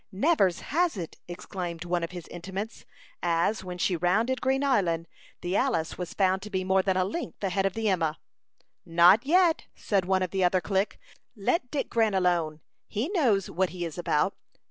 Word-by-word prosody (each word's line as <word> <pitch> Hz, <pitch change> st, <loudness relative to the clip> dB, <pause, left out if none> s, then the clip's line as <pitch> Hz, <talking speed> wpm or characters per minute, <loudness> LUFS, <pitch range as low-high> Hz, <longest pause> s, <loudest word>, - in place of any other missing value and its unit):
"Nevers 195 Hz, -, +2 dB
has 335 Hz, -, 0 dB
it!" 170 Hz, -3 st, -6 dB
exclaimed 175 Hz, -1 st, -6 dB
one 175 Hz, 0 st, 0 dB
of 170 Hz, -, -2 dB
his 175 Hz, -2 st, -8 dB
intimates, 195 Hz, +5 st, -6 dB, 0.4 s
as, 175 Hz, +4 st, +1 dB
when 180 Hz, -1 st, -6 dB
she 180 Hz, +1 st, +1 dB
rounded 220 Hz, +9 st, +1 dB
Green 265 Hz, +1 st, +1 dB
Island, 175 Hz, -11 st, +1 dB, 0.3 s
the 180 Hz, +2 st, -2 dB
Alice 215 Hz, -11 st, 0 dB
was 180 Hz, -2 st, -6 dB
found 190 Hz, -1 st, +2 dB
to 210 Hz, -, -8 dB
be 190 Hz, -2 st, -1 dB
more 190 Hz, +1 st, +3 dB
than 190 Hz, -1 st, 0 dB
a 185 Hz, -, +2 dB
length 215 Hz, -, -5 dB
ahead 195 Hz, 0 st, +1 dB
of 195 Hz, -, -5 dB
the 225 Hz, -1 st, -1 dB
Emma. 165 Hz, -5 st, +1 dB, 0.7 s
"Not 175 Hz, +9 st, +5 dB
yet," 345 Hz, 0 st, +4 dB
said 195 Hz, -3 st, 0 dB
one 185 Hz, 0 st, +2 dB
of 180 Hz, -, -3 dB
the 190 Hz, -1 st, 0 dB
other 180 Hz, +1 st, +3 dB
clique. 195 Hz, +2 st, -1 dB, 0.4 s
"Let 245 Hz, -, 0 dB
Dick 285 Hz, 0 st, -2 dB
Grant 220 Hz, -3 st, +1 dB
alone. 170 Hz, -4 st, +1 dB, 0.3 s
He 230 Hz, +9 st, -2 dB
knows 245 Hz, -, +2 dB
what 185 Hz, +1 st, +1 dB
he 175 Hz, -1 st, -4 dB
is 165 Hz, +1 st, -6 dB
about. 175 Hz, +2 st, +1 dB
190 Hz, 190 wpm, -27 LUFS, 175-220 Hz, 0.7 s, Not